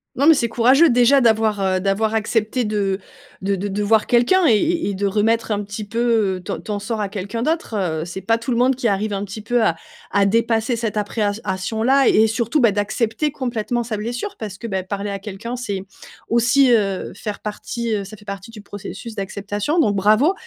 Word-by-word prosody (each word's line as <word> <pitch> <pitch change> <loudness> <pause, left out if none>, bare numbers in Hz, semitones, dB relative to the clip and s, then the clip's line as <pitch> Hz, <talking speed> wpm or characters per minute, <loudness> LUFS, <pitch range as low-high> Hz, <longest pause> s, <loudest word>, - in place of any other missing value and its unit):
Non, 275 - +1
mais 325 - +8
c'est 250 -6 +1
courageux 260 +8 +5
déjà 250 +3 +5
d'avoir, 220 -3 +2
heu 185 -1 +1
d'avoir 200 +3 0
accepté 220 +2 0
de 200 -2 -1 0.4
de 200 +1 +1
de 195 +2 -3
de 205 +1 -2
voir 215 +1 +3
quelqu'un 315 +10 +4
et 230 - +5
et 330 +5 0
et - - -2
de 200 +2 -2
remettre 220 +3 +1
un 205 0 0
petit 205 +2 -6
peu 225 -5 +1
ton - - -4
ton 210 -1 -4
sort 215 +2 -4
à 205 - -1
quelqu'un 200 +3 -4
d'autre, 315 -5 -1 0.3
heu. - - -2
C'est 180 +2 -7
pas 225 +4 +1
tout 235 +3 -6
le 235 - +1
monde 255 +2 +3
qui 245 -2 -1
arrive 205 +1 0
un 200 0 -2
petit 205 +2 -8
peu 240 +1 +1
à 165 - +2 0.3
à 200 0 +2
dépasser 225 +2 +1
cette 225 -2 -3
appréhension 205 0 -2
là 270 +2 +4
et 220 - +5
surtout, 235 +6 0
bah, 230 - +5
d'accepter 220 +7 -1
complètement 240 -3 -2
sa 225 -1 -4
blessure 245 - -4
parce 205 -4 -6
que, 235 - -9
beh, 190 -4 -2
parler 200 +2 -4
à 200 - -4
quelqu'un, 205 +4 -6
c'est 205 -6 -4 0.5
aussi, 245 +3 +4
heu, 200 -5 +1
faire 210 +1 -6
partie 225 +2 -4
ça 205 +2 -10
fait 205 - -18
partie 200 +2 -7
du 220 -2 -11
processus 205 +3 -8
d'acceptation 205 - -3
donc, 210 -9 +3
bravo 215 - +4
220 Hz, 210 wpm, -20 LUFS, 205-240 Hz, 0.5 s, mais